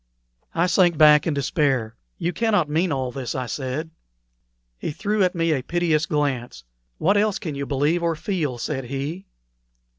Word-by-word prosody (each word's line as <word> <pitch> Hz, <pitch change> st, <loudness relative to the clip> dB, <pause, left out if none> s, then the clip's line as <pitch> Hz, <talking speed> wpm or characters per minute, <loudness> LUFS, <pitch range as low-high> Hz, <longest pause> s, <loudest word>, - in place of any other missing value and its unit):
I 170 Hz, -, +3 dB
sank 175 Hz, -2 st, +3 dB
back 150 Hz, 0 st, +6 dB
in 155 Hz, -, 0 dB
despair. 135 Hz, -5 st, 0 dB, 0.2 s
"You 175 Hz, 0 st, -2 dB
cannot 210 Hz, -8 st, +2 dB
mean 165 Hz, +4 st, 0 dB
all 130 Hz, -2 st, -1 dB
this," 130 Hz, -3 st, -5 dB
I 130 Hz, -1 st, -2 dB
said. 135 Hz, +5 st, -4 dB, 0.9 s
He -, -, -3 dB
threw 210 Hz, +7 st, -1 dB
at 180 Hz, -1 st, +1 dB
me 165 Hz, -1 st, +1 dB
a 135 Hz, -, -1 dB
piteous 165 Hz, +1 st, 0 dB
glance. 135 Hz, -, -2 dB, 0.3 s
"What 200 Hz, +5 st, +2 dB
else 210 Hz, -1 st, +2 dB
can 155 Hz, -, -5 dB
you 140 Hz, 0 st, -4 dB
believe 145 Hz, +5 st, +1 dB
or 170 Hz, -1 st, 0 dB
feel?" 155 Hz, -7 st, -2 dB
said 130 Hz, +2 st, -3 dB
he. 140 Hz, +9 st, -5 dB
155 Hz, 170 wpm, -23 LUFS, 135-175 Hz, 0.9 s, back